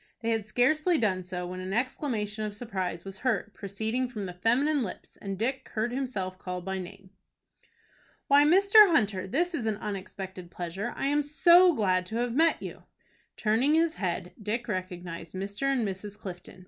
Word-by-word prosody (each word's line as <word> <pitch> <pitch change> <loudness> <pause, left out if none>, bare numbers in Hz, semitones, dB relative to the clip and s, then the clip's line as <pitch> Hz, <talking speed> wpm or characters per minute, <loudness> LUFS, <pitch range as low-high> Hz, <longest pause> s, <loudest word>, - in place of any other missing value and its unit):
They 230 0 0
had 220 -2 -1
scarcely 305 +10 +3
done 190 -7 +1
so, 180 0 -5
when 180 +1 -6
an 185 +1 -4
exclamation 220 -3 -2
of 210 -1 -4
surprise 190 -6 -4
was 195 0 -7
heard, 220 -4 -1
proceeding 220 +6 -2
from 210 -5 -5
feminine 260 +10 +2
lips, 210 - -6
and 195 -1 -5
Dick 260 +5 -2
heard 220 +2 0
himself 210 -8 -3
called 180 -1 -5
by 190 0 -2
name. 185 +1 -10 1.2
"Why, 285 +1 +6
Mr. 395 +6 +7
Hunter, 205 - +1
this 345 - 0
is 240 -9 -2
an 215 -2 0
unexpected 190 -3 -6
pleasure. 185 +7 -4
I - - -2
am 290 +2 +2
so 345 +5 +6
glad 185 -4 +1
to 220 - -6
have 240 0 0
met 325 +5 +3
you." - - -7 0.6
Turning 235 +8 +2
his 325 0 +3
head, 180 - -3
Dick 220 +4 -2
recognized 180 -4 -5
Mr. 200 +8 -2
and 245 -5 +1
Mrs. 200 +2 -6
Clifton. 185 -3 -9
215 Hz, 175 wpm, -28 LUFS, 190-265 Hz, 1.2 s, Mr